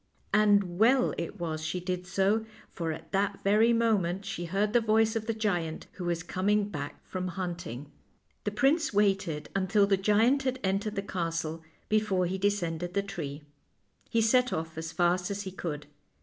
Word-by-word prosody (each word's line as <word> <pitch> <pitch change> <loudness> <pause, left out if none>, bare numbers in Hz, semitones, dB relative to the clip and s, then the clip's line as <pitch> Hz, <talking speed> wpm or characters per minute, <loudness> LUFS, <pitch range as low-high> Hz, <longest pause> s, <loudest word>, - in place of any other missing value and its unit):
And 200 -4 +3
well 250 +4 +5
it 170 - -3
w 175 - -3
r - - -2
as 155 0 -5
she 160 +3 -2
did 180 0 -3
so, 200 +4 +2 0.3
for 165 -2 -3
at 155 - -8
that 200 0 0
very 215 +4 +4
moment 205 -5 +1
she 195 -4 -4
heard 200 +5 0
the 240 - +5
voice 220 0 +3
of 220 -1 -2
the 225 - +1
giant, 175 -7 -1
who 180 - -7
was 170 0 -1
coming 205 +3 +1
back 145 -6 -6
from 185 -1 -4
hunting. 170 -7 -5 0.5
The - - 0
prince 275 +9 +2
waited 195 -7 +1
until 195 +1 +3
the 200 -1 +2
giant 220 +8 +3
had 260 -1 -1
entered 200 +2 0
the 195 - -2
castle 165 -4 -3 0.3
before 210 -4 +2
he 190 +2 -2
descended 175 -3 -1
the 200 - +2
tree. 150 -7 -6 0.7
He 230 - +2
set 250 +3 +3
off 160 0 -3
as 160 0 -5
fast 180 +1 +1
as 200 0 -3
he 190 - -6
could. 150 -5 -5
195 Hz, 185 wpm, -29 LUFS, 175-210 Hz, 0.7 s, well